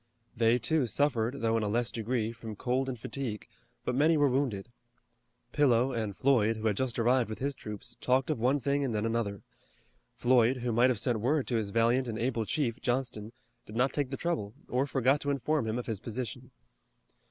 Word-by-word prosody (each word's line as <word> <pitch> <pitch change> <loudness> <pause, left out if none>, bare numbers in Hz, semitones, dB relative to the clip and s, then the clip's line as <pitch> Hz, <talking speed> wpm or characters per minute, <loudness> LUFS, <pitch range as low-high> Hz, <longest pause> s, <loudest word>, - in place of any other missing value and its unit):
They, 115 +1 +3
too, 130 +3 +1
suffered 125 +1 0
though 115 0 +2
in - - 0
a 105 - -1
less 120 +3 +1
degree 115 0 -1
from 115 -2 -8
cold 130 +5 -1
and 125 -3 -5
fatigue, 120 -4 -5 0.4
but 125 - 0
many 155 +5 +4
were 145 -1 +4
wounded. 120 -5 -1 0.8
Pillow 130 -3 +3
and 110 -4 -3
Floyd, 115 -5 +3
who 110 - -6
had 105 -2 +2
just 130 +1 -2
arrived 120 0 +2
with 110 - -5
his 140 +2 -2
troops, 105 -5 -8
talked 130 +3 +2
of 145 - -2
one 130 +5 +2
thing 140 +2 0
and 125 -5 -1
then 105 +1 0
another. 115 -3 -2 0.7
Floyd, 125 0 +3
who 125 -1 -2
might 120 +3 +4
have 125 - +1
sent 120 0 +1
word 135 +5 +1
to 120 - 0
his 105 -2 -2
valiant 115 +4 +2
and 110 -2 -3
able 115 -1 -1
chief, 125 -1 -1
Johnston, 120 -4 -2 0.4
did 105 - -10
not 125 +3 +2
take 145 -3 -1
the 135 - -4
trouble 140 -12 -2
or 130 +3 0
forgot 135 +2 +2
to 145 - -2
inform 140 -2 0
him 110 +2 -1
of 125 - -4
his 110 -4 -3
position. 120 +1 -5
120 Hz, 205 wpm, -30 LUFS, 115-135 Hz, 0.8 s, many